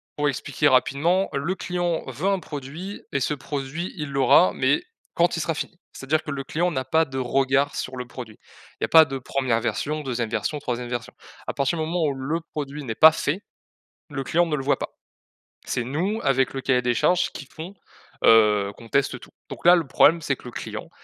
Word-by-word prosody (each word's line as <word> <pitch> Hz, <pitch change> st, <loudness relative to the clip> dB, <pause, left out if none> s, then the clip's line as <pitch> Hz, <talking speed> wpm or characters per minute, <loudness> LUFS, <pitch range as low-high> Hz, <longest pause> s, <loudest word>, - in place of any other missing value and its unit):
pour 145 Hz, 0 st, +1 dB
expliquer 145 Hz, +1 st, 0 dB
rapidement, 160 Hz, +9 st, +2 dB
le 165 Hz, +7 st, -1 dB
client 175 Hz, 0 st, -2 dB
veut 140 Hz, +9 st, -3 dB
un 195 Hz, -, +1 dB
produit 155 Hz, +6 st, -7 dB
et 140 Hz, -, 0 dB
ce 150 Hz, -, 0 dB
produit, 145 Hz, +4 st, -5 dB
il 150 Hz, -2 st, -4 dB
l'aura, 135 Hz, -8 st, +5 dB
mais 130 Hz, -, +2 dB, 0.3 s
quand 170 Hz, 0 st, +2 dB
il -, -, -1 dB
sera 165 Hz, -, -1 dB
fini. 175 Hz, -, -5 dB, 0.2 s
C'est-à-dire 150 Hz, +4 st, -1 dB
que 150 Hz, -, -5 dB
le 135 Hz, -1 st, -4 dB
client 175 Hz, +3 st, 0 dB
n'a 130 Hz, -3 st, -2 dB
pas 160 Hz, +4 st, +3 dB
de 135 Hz, -1 st, -7 dB
regard 135 Hz, +2 st, +1 dB
sur 130 Hz, 0 st, -4 dB
le 125 Hz, -, -4 dB
produit. 120 Hz, -4 st, -9 dB, 0.4 s
Il -, -, -4 dB
y -, -, +4 dB
a -, -, -6 dB
pas 160 Hz, -1 st, +8 dB
de 135 Hz, 0 st, -4 dB
1re 130 Hz, -3 st, 0 dB
version, 150 Hz, +5 st, -2 dB
2e 120 Hz, -5 st, -2 dB
version, 150 Hz, +5 st, -2 dB
3e 125 Hz, -2 st, -4 dB
version. 120 Hz, 0 st, -4 dB, 0.3 s
À -, -, -2 dB
partir 140 Hz, +4 st, 0 dB
du 160 Hz, -, -1 dB
moment 170 Hz, +1 st, -1 dB
où 145 Hz, -, 0 dB
le 135 Hz, +5 st, -2 dB
produit 145 Hz, 0 st, -5 dB
n'est 110 Hz, -2 st, -4 dB
pas 160 Hz, 0 st, +9 dB
fait, 160 Hz, +4 st, -2 dB, 0.7 s
le 135 Hz, -2 st, -4 dB
client 170 Hz, +6 st, +2 dB
ne 155 Hz, -2 st, -1 dB
le 135 Hz, -, -3 dB
voit 140 Hz, -, +2 dB
pas. -, -, -4 dB, 0.8 s
C'est 125 Hz, -, -1 dB
nous, 180 Hz, -, -1 dB
avec 135 Hz, -1 st, +2 dB
le 135 Hz, -, -4 dB
cahier 125 Hz, -1 st, +2 dB
des 125 Hz, -1 st, +1 dB
charges, 180 Hz, +9 st, +2 dB
qui 140 Hz, -, -8 dB
font, 165 Hz, +7 st, -9 dB, 0.5 s
heu, 105 Hz, -3 st, +5 dB
qu'on 115 Hz, -1 st, -13 dB
teste 140 Hz, +3 st, +1 dB
tout. -, -, -13 dB, 0.2 s
Donc -, -, -9 dB
là, 175 Hz, +1 st, +9 dB
le 165 Hz, -5 st, -1 dB
problème 165 Hz, +5 st, +5 dB
c'est 140 Hz, -3 st, 0 dB
que -, -, -19 dB
le 125 Hz, -, -7 dB
client, -, -, -7 dB
140 Hz, 220 wpm, -24 LUFS, 130-160 Hz, 0.8 s, pas